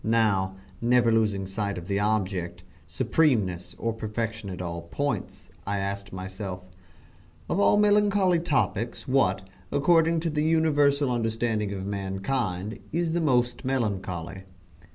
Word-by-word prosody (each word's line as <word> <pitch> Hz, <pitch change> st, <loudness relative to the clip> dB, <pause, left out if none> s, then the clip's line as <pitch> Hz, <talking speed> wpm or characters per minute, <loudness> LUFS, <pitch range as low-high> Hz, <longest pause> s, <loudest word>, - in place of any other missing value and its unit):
Now, 105 Hz, -4 st, +2 dB, 0.3 s
never 120 Hz, 0 st, +4 dB
losing 105 Hz, -3 st, +1 dB
sight 100 Hz, 0 st, -3 dB
of 90 Hz, 0 st, -7 dB
the 100 Hz, 0 st, 0 dB
object 95 Hz, -4 st, -1 dB, 0.2 s
supremeness 105 Hz, -, +1 dB
or 115 Hz, 0 st, -1 dB
perfection 110 Hz, -1 st, -4 dB
at 90 Hz, -, -6 dB
all 85 Hz, -1 st, -4 dB
points, 140 Hz, +12 st, -4 dB, 0.2 s
I 100 Hz, 0 st, 0 dB
asked 100 Hz, 0 st, -3 dB
myself 95 Hz, 0 st, -6 dB, 0.8 s
"Of 190 Hz, -, 0 dB
all 205 Hz, -, +5 dB
melancholy 205 Hz, -3 st, +4 dB
topics 120 Hz, -, -1 dB
what, 95 Hz, -8 st, +2 dB, 0.2 s
according 165 Hz, +2 st, +3 dB
to 165 Hz, -1 st, -1 dB
the 150 Hz, 0 st, 0 dB
universal 145 Hz, -4 st, +3 dB
understanding 115 Hz, -3 st, -1 dB
of 95 Hz, -1 st, -4 dB
mankind, 100 Hz, +1 st, -2 dB
is 165 Hz, 0 st, 0 dB
the 170 Hz, -, +1 dB
most 125 Hz, -5 st, +1 dB
melancholy?" 95 Hz, -8 st, -2 dB
110 Hz, 130 wpm, -26 LUFS, 95-140 Hz, 0.8 s, all